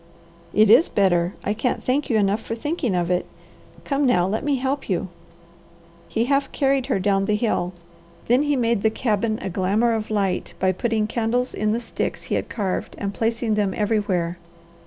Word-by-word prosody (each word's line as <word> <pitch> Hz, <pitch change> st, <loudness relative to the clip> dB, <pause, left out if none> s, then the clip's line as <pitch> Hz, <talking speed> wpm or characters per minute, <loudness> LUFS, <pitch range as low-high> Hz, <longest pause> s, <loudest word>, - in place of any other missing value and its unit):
"It 215 Hz, 0 st, +5 dB
is 260 Hz, +9 st, +6 dB
better. 180 Hz, -3 st, +2 dB
I 205 Hz, -, 0 dB
can't 235 Hz, +4 st, -1 dB
thank 275 Hz, +3 st, 0 dB
you 230 Hz, -, +3 dB
enough 205 Hz, +1 st, +1 dB
for 225 Hz, -, -4 dB
thinking 265 Hz, -, -2 dB
of 175 Hz, 0 st, 0 dB
it. 180 Hz, -, 0 dB, 0.6 s
Come 280 Hz, -1 st, +1 dB
now, 180 Hz, -8 st, +3 dB
let 205 Hz, +4 st, -2 dB
me 285 Hz, -1 st, +1 dB
help 270 Hz, +1 st, -2 dB
you." 185 Hz, 0 st, -1 dB, 1.0 s
He 230 Hz, +1 st, 0 dB
half 275 Hz, +1 st, +1 dB
carried 270 Hz, -2 st, +1 dB
her 260 Hz, -, +1 dB
down 195 Hz, 0 st, +1 dB
the 210 Hz, -, +1 dB
hill. 200 Hz, -5 st, 0 dB, 0.5 s
Then 245 Hz, +3 st, +4 dB
he 290 Hz, -1 st, +1 dB
made 235 Hz, -4 st, +1 dB
the 220 Hz, -, +3 dB
cabin 215 Hz, -1 st, 0 dB
a -, -, -2 dB
glamour 205 Hz, +6 st, +1 dB
of 220 Hz, -1 st, -3 dB
light 200 Hz, -4 st, -1 dB
by 185 Hz, 0 st, +2 dB
putting 220 Hz, +3 st, 0 dB
candles 235 Hz, +3 st, -1 dB
in 215 Hz, 0 st, 0 dB
the 230 Hz, -, 0 dB
sticks 235 Hz, -, -4 dB
he -, -, -4 dB
had -, -, -1 dB
carved 195 Hz, -5 st, -3 dB
and 200 Hz, -1 st, -3 dB
placing 225 Hz, +1 st, 0 dB
them 205 Hz, -2 st, 0 dB
everywhere. 195 Hz, -5 st, 0 dB
220 Hz, 190 wpm, -23 LUFS, 195-245 Hz, 1.0 s, is